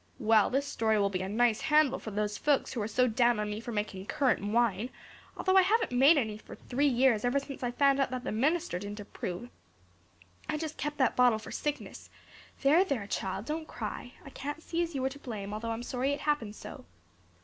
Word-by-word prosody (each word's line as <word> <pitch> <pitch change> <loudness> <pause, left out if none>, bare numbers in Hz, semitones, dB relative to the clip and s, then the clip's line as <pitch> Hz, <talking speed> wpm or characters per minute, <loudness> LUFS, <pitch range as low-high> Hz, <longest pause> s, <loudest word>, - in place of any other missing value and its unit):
Well, 220 -4 +4
this 275 +2 0
story 220 -5 +1
will 200 -1 +2
be 185 -1 -2
a 190 - -3
nice 225 +1 +2
handle 300 -3 +3
for - - -7
those 210 0 -2
folks 290 +3 +1
who 240 - -2
are 205 - -1
so 250 +3 +2
down 240 -1 +2
on 210 0 -2
me 210 - -4
for 235 +1 -6
making 205 -3 -4
currant 280 -8 +1
wine, 230 -1 +1 0.5
although 375 0 +1
I - - +9
haven't 435 - +2
made 270 +6 +6
any 215 -5 -1
for - - -11
three 280 +4 0
years 250 -4 +3
ever 245 +3 +2
since 275 0 -9
I 245 - -1
found 275 +2 +3
out 275 - +2
that 255 0 -4
the - - -3
minister 300 - 0
didn't 205 +2 -7
approve. 205 +2 -6 1.0
I 305 - 0
just 315 0 -5
kept 295 0 -3
that 260 -3 +2
bottle 245 -3 +5
for 215 - -10
sickness. 295 -1 -4 0.5
There, 305 +7 +6
there, 275 - -2
child, 195 0 -3
don't 315 +3 -4
cry. 245 +2 -6
I 275 - -10
can't 290 +4 -6
see 335 0 -2
as 335 -3 -3
you 265 - -1
were 265 - +1
to 280 +1 -11
blame 210 -6 -6
although 225 +2 -4
I'm 225 +1 -3
sorry 260 +3 -1
it 285 - -5
happened 240 -9 -1
so." - - -10
245 Hz, 225 wpm, -30 LUFS, 215-285 Hz, 1.0 s, I